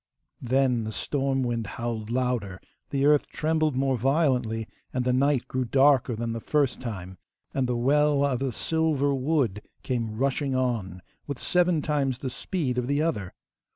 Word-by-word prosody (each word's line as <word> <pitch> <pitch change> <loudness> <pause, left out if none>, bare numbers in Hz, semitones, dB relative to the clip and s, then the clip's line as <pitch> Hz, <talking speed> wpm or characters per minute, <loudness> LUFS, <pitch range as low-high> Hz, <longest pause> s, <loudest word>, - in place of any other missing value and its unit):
Then 125 -1 +2
the 110 - -4
storm 135 +2 -1
wind 115 -3 -2
howled 115 -2 -3
louder, 120 -6 -1 0.3
the 140 0 +1
earth 150 0 +4
trembled 155 -2 0
more 135 -1 +1
violently, 125 -5 +1 0.2
and 125 -1 -1
the 125 - +2
night 135 0 +2
grew 130 0 -1
darker, 135 -1 +3
than 115 +1 -3
the 115 - -3
first 140 +1 0
time, 95 -6 -6 0.3
and 135 -2 0
the 125 -1 0
Welwa 140 +2 +3
of 125 - -1
the 135 -1 -1
silver 150 +1 +1
wood 130 -7 0 0.2
came 115 -4 -2
rushing 135 +1 0
on 110 -8 -1 0.2
with 140 -3 -4
seven 175 -2 +2
times 140 -4 0
the 130 0 -4
speed 135 -5 -2
of 125 - -2
the 140 +1 +1
other. 105 - -2
130 Hz, 165 wpm, -26 LUFS, 120-140 Hz, 0.3 s, earth